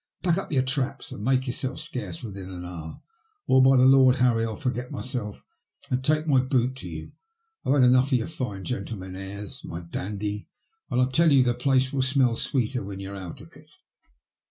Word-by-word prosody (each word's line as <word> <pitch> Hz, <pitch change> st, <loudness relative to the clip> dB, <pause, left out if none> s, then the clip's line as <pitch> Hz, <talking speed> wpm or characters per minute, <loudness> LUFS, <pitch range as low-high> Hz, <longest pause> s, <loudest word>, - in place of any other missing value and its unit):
Pack 175 Hz, 0 st, +2 dB
up 195 Hz, -, -7 dB
your 130 Hz, -3 st, +2 dB
traps 130 Hz, 0 st, -2 dB
and 105 Hz, -, -7 dB
make 130 Hz, +2 st, +2 dB
yourself 130 Hz, +2 st, -2 dB
scarce 125 Hz, -, -5 dB
within 100 Hz, -4 st, -7 dB
an 90 Hz, -1 st, -7 dB
hour, 80 Hz, -3 st, -8 dB, 0.4 s
or, 130 Hz, -, +5 dB
by 130 Hz, 0 st, +6 dB
the 125 Hz, -, +6 dB
Lord 130 Hz, -1 st, +6 dB
Harry, 125 Hz, -3 st, +2 dB
I'll 110 Hz, -1 st, -2 dB
forget 125 Hz, -2 st, -3 dB
myself 120 Hz, -5 st, -4 dB, 0.5 s
and 130 Hz, +1 st, 0 dB
take 155 Hz, +2 st, +2 dB
my 140 Hz, -5 st, +4 dB
boot 130 Hz, -1 st, +1 dB
to 90 Hz, -, -7 dB
you. 80 Hz, -1 st, -7 dB, 0.5 s
I've -, -, +2 dB
had 135 Hz, -, +5 dB
enough 125 Hz, +1 st, +5 dB
of 130 Hz, -, +5 dB
your 115 Hz, -, -2 dB
fine 125 Hz, -11 st, -5 dB
gentleman 95 Hz, -7 st, -5 dB
airs, 100 Hz, +1 st, -8 dB
my 85 Hz, +1 st, -6 dB
dandy, 100 Hz, +4 st, -4 dB, 0.4 s
and -, -, 0 dB
I 125 Hz, -, +5 dB
tell 155 Hz, +5 st, +3 dB
you 135 Hz, -2 st, +6 dB
the 120 Hz, -1 st, +2 dB
place 130 Hz, +1 st, +1 dB
will 135 Hz, -, +1 dB
smell 130 Hz, -2 st, +3 dB
sweeter 125 Hz, -1 st, 0 dB
when 100 Hz, 0 st, -7 dB
you're 100 Hz, +1 st, -6 dB
out 95 Hz, -4 st, -8 dB
of -, -, -15 dB
it." -, -, -17 dB
125 Hz, 205 wpm, -26 LUFS, 100-130 Hz, 0.5 s, by